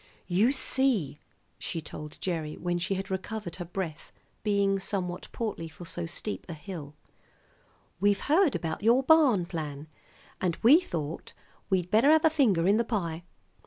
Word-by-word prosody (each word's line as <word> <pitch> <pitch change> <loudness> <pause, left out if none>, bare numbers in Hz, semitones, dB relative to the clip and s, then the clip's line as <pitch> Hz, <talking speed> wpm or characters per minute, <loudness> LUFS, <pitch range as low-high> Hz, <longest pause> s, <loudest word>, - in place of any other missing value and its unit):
"You 195 +8 +3
see," 260 - 0 0.4
she 165 - -3
told 150 -1 -8
Gerry 160 -4 -3
when 175 0 -1
she 190 +3 -1
had 190 +1 -5
recovered 190 -1 -4
her 175 - -5
breath, 170 -3 -5 0.3
being 200 -2 +2
somewhat 185 -2 -2
portly 210 -8 -3
for 165 +3 -11
so 170 0 -4
steep 190 +5 -5
a 165 - -5
hill, 150 -2 -8 1.0
"we've 205 +1 +2
heard 315 +1 +3
about 160 -1 -3
your 235 +5 +4
barn 270 - +5
plan, 150 -4 -5 0.6
and 175 -3 0
we 275 +9 +8
thought 165 - -5 0.4
we'd 180 -2 0
better 230 +7 +5
have 315 +1 +5
a 320 - +5
finger 215 - +3
in 205 +2 +5
the 235 - +2
pie. 175 -8 -2
190 Hz, 160 wpm, -28 LUFS, 165-225 Hz, 1.0 s, we